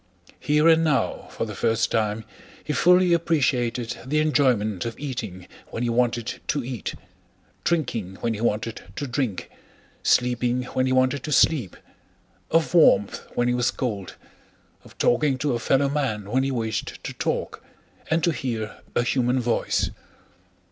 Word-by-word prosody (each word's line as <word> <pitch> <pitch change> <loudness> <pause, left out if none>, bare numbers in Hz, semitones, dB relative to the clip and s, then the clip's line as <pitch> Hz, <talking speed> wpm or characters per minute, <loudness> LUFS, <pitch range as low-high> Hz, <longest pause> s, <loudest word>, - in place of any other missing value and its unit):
Here 150 +2 +3
and 165 0 +6
now 150 -4 0
for - - -3
the - - -6
first 115 0 +1
time 110 0 0 0.4
he 150 - -2
fully 180 +4 +5
appreciated 125 -8 0
the 140 +5 -1
enjoyment 125 - +2
of 115 -1 -5
eating 115 -10 -5 0.2
when 115 - -4
he 120 - 0
wanted 120 -1 0
to 145 -3 0
eat, 120 -4 -5 0.7
drinking 115 - -1
when 115 +3 -2
he 105 - -5
wanted 115 0 -1
to 145 - -3
drink, 125 -6 -3 0.5
sleeping 125 0 +2
when 130 0 +1
he - - 0
wanted 130 +1 +2
to 155 - -4
sleep, 135 - +3 0.7
of 165 +1 +2
warmth 105 - +4
when 120 - +1
he 125 - +2
was 125 0 +2
cold, 105 -7 -4 0.7
of - - -17
talking 135 +2 +2
to 140 0 0
a 120 - -1
fellow 135 +4 +2
man 110 -8 -2
when 130 +2 +3
he 135 - 0
wished 115 -4 -3
to - - -5
talk - - -3 0.5
and 160 0 +1
to 170 - +3
hear 115 -7 -4 0.2
a 120 - +3
human 125 +1 +1
voice. 120 -1 0
125 Hz, 155 wpm, -24 LUFS, 115-145 Hz, 0.7 s, and